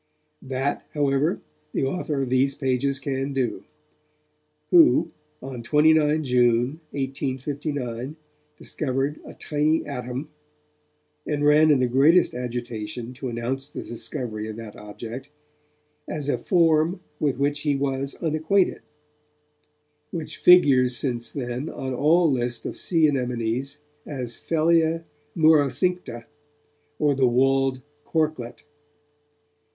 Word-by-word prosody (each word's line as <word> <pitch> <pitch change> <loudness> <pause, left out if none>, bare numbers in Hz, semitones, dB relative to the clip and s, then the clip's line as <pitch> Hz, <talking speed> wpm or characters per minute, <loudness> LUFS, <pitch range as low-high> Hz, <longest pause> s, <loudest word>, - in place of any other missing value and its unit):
That 135 +2 -3
however, 145 +3 +1 0.3
the - - 0
author 145 -1 -2
of 125 - -4
these 135 +2 +2
pages 135 0 0
can 135 0 -3
do, 130 -3 -2 1.1
who, 315 - +6 0.3
on 130 -2 -6
29 150 +4 +3
June 125 +2 +2
1859, 135 -1 -4 0.4
discovered 135 +1 -2
a - - -10
tiny 155 +2 0
atom, 125 0 -5 1.0
and 145 0 0
ran 150 +1 +6
in 145 - +5
the 125 - +2
greatest 145 +8 +4
agitation 120 -1 -5
to 130 0 -5
announce 125 +4 -3
the - - -7
discovery 115 -2 -5
of 110 - -6
that 115 -2 -9
object 115 +6 -8 0.8
'as 145 -2 -4
a - - +1
form 165 0 +2 0.2
with 140 -4 0
which 145 +1 0
he 145 -1 0
was 135 0 -2
unacquainted', 160 +4 +1 1.3
which 155 -1 -6
figures 135 -9 +5
since 120 -4 -2
then 125 +2 -4
on 130 -2 -5
all 160 +5 +3
lists 120 -2 -2
of - - -4
sea 165 -3 +2
anemones 125 +1 -2 0.3
as 125 -5 -5
phellia 165 0 +2 0.3
murocincta, 155 -3 +2 0.7
or 145 -1 +2
the 135 -2 +3
walled 135 +1 +2 0.2
corklet. 155 -7 -2
135 Hz, 115 wpm, -24 LUFS, 125-155 Hz, 1.3 s, who